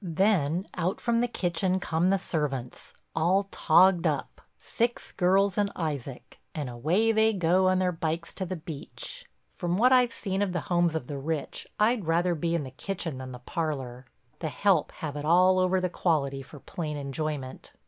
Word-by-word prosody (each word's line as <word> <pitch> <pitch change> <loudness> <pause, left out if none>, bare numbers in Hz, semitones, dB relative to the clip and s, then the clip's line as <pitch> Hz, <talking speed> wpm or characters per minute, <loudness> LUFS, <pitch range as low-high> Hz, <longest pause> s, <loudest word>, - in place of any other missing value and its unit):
Then 180 -1 +1
out 180 +1 -1
from 235 -1 +1
the 245 - +2
kitchen 185 -3 0
come 170 +1 +1
the 195 - +3
servants, 145 -9 -4 0.2
all 180 +5 +3
togged 180 +2 +4
up, - - -3 0.2
six 240 0 -2
girls 195 +2 +2
and 200 -1 +1
Isaac, 140 -6 -5 0.2
and 145 -5 -3
away 170 - +2
they 220 0 +3
go 185 0 +3
on 185 0 +3
their 185 -1 +2
bikes 165 0 -3
to 190 - -4
the 185 - -3
beach. 175 - -8 0.2
From 175 -1 -2
what 250 +4 +5
I've 250 -2 +5
seen 195 -3 -3
of 195 -3 0
the 175 - -1
homes 175 -1 +1
of 160 - -2
the 140 +1 -5
rich 150 0 -3
I'd 215 -3 +2
rather 175 +2 +2
be 170 +1 -1
in 165 - -1
the 130 - -8
kitchen 165 -1 -4
than 130 0 -7
the 125 - -7
parlor—the 130 -2 -5
help 175 +4 +2
have 150 -2 -5
it 145 - -4
all 180 +4 +5
over 185 0 +2
the 185 - 0
quality 145 -6 0
for 140 +2 -12
plain 150 +1 -5
enjoyment. 140 -1 -4
170 Hz, 180 wpm, -28 LUFS, 150-190 Hz, 0.2 s, what